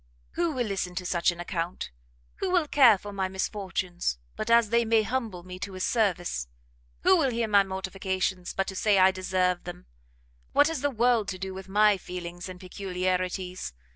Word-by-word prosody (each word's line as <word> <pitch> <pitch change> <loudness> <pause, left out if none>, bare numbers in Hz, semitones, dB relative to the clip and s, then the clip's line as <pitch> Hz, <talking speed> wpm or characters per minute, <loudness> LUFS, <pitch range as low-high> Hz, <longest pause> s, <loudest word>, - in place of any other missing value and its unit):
Who 340 -2 0
will 250 -3 -1
listen 190 -3 -3
to 180 0 -3
such 175 -1 +2
an 175 -1 -3
account? 175 - -4 0.5
who 385 - -2
will 355 -4 +2
care 255 -8 +6
for 205 +2 -9
my 190 -1 -1
misfortunes, 185 - -2 0.2
but 215 - -4
as 230 -2 +5
they 235 0 +4
may 225 -1 +3
humble 220 -6 -3
me 180 0 -9
to 195 +1 -5
his 185 0 -4
service? 175 - 0 0.6
Who 380 - +6
will 295 -5 +2
hear 235 -2 -1
my 200 -2 +5
mortifications, 190 -1 -2
but 195 - -1
to 190 - -7
say 205 +1 +3
I 190 0 +6
deserve 185 -1 0
them? 175 0 -8 0.7
what 290 +2 +5
has 325 -5 -3
the 285 - +2
world 235 -3 +2
to 185 - -3
do 190 0 -5
with 190 0 -9
my 210 0 +4
feelings 175 0 -7
and 180 -1 -9
peculiarities? 185 - -3
190 Hz, 190 wpm, -27 LUFS, 180-220 Hz, 0.7 s, care